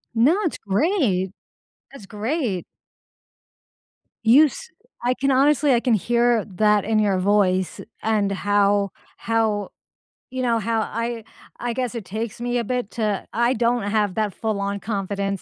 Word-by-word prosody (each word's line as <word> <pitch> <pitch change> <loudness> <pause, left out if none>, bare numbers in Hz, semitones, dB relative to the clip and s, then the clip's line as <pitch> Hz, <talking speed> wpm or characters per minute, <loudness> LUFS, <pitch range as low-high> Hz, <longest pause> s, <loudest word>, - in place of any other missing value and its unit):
No, 280 - +4
it's 340 - -1
great. 205 - 0 0.6
That's 245 -8 -12
great. 215 - -2 1.6
You 270 +8 +7
s 480 - -6 0.3
I 250 +1 +2
can 275 0 0
honestly 280 +1 +4
I 235 - +4
can 240 -2 +1
hear 235 +1 +2
that 210 +1 +2
in 220 0 +2
your 200 -3 +2
voice 190 -2 +1 0.2
and 210 -2 +1
how 200 0 +2 0.3
how 220 -3 0 0.6
you 260 0 -3
know, 230 -2 +2
how 225 +1 0
I 230 +1 -3 0.4
I 240 -1 -2
guess 245 -1 -3
it 220 -5 -5
takes 220 +4 -5
me 245 0 -1
a - - -1
bit 245 -2 -3
to 210 -4 -2
I 235 +2 +2
don't 235 -1 +1
have 205 -2 0
that 215 -3 -1
full 220 -3 -2
on 200 0 -2
confidence 200 -2 -3
220 Hz, 150 wpm, -22 LUFS, 200-245 Hz, 1.6 s, You